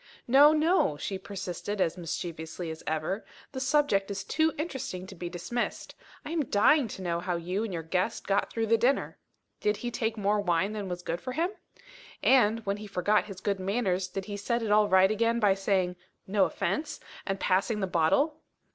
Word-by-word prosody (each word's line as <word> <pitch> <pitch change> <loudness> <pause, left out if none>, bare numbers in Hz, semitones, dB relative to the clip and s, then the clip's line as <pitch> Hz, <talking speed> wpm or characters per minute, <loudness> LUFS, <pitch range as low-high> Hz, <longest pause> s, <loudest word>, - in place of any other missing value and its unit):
"No, 280 +4 +7
no," 310 - +2
she 190 +5 -4
persisted 195 +1 -5
as 170 -3 +1
mischievously 165 -1 -5
as 160 - -8
ever, 160 +6 -1 0.3
"the 260 - -5
subject 260 -8 +2
is 200 -1 -4
too 315 +10 +1
interesting 265 - -4
to 190 - -10
be 175 -1 -6
dismissed. 185 +8 -3 0.3
I - - -5
am 325 -4 0
dying 245 +6 +4
to 190 -3 -7
know 170 -1 -1
how 180 0 -2
you 180 +5 -2
and 225 - -4
your 165 -2 -4
guest 185 +7 -1
got 200 0 +1
through 225 -1 -1
the 225 +1 +3
dinner. 260 +4 +1 0.4
Did 210 0 +1
he 240 +3 -4
take 225 -1 -2
more 205 0 +1
wine 185 +1 +1
than 205 -3 -4
was 180 0 -5
good 170 +1 -3
for 255 - -5
him? 335 +6 0 0.7
And, 230 -4 +4
when 200 0 -1
he 210 0 -8
forgot 200 +2 +1
his 195 -3 -9
good 200 -2 -1
manners, 190 -2 0
did 190 +1 -5
he 205 -1 -5
set 235 +3 -1
it 215 - -1
all 210 0 +5
right 190 +1 +5
again 230 +2 +1
by 205 -3 +4
saying, 190 -2 0 0.3
'No 195 0 +3
offence,' 305 0 -2 0.3
and 195 -1 -1
passing 200 +4 +1
the 195 - 0
bottle?" 230 - +1
200 Hz, 200 wpm, -29 LUFS, 185-230 Hz, 0.7 s, No